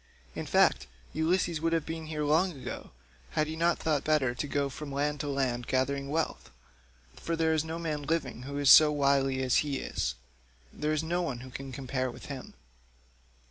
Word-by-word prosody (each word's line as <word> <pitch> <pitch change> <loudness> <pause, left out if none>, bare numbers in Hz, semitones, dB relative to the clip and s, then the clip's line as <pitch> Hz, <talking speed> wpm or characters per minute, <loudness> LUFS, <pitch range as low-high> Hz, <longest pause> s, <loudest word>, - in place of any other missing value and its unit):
In - - -5
fact - - +3 0.3
Ulysses 165 0 +1
would 165 0 +1
have 165 -2 +1
been 160 -1 -5
here 155 -1 -3
long 165 +5 +3
ago, - - -6 0.5
had 155 - +4
he 155 +1 -5
not 170 +1 +2
thought 150 -3 0
better 150 -5 +2
to 135 +4 -3
go 140 0 0
from 140 +1 -7
land 145 +1 -1
to 145 - -3
land 130 -4 -1
gathering 140 +1 0
wealth; 160 +2 -2 0.7
for 165 - -3
there 160 -1 +2
is 155 -1 +1
no 160 +1 -4
man 155 -3 -3
living 155 -4 -2
who 140 +2 -6
is 145 -2 +5
so 155 -1 +9
wily 140 -2 +2
as 130 -2 +3
he 145 -2 0
is; - - -2 0.6
there 150 +1 -1
is 155 0 0
no 175 +2 0
one 130 -6 -4
can 135 +1 -7
compare 130 0 -2
with 120 - -10
him. 130 - -9
145 Hz, 190 wpm, -30 LUFS, 135-160 Hz, 0.7 s, so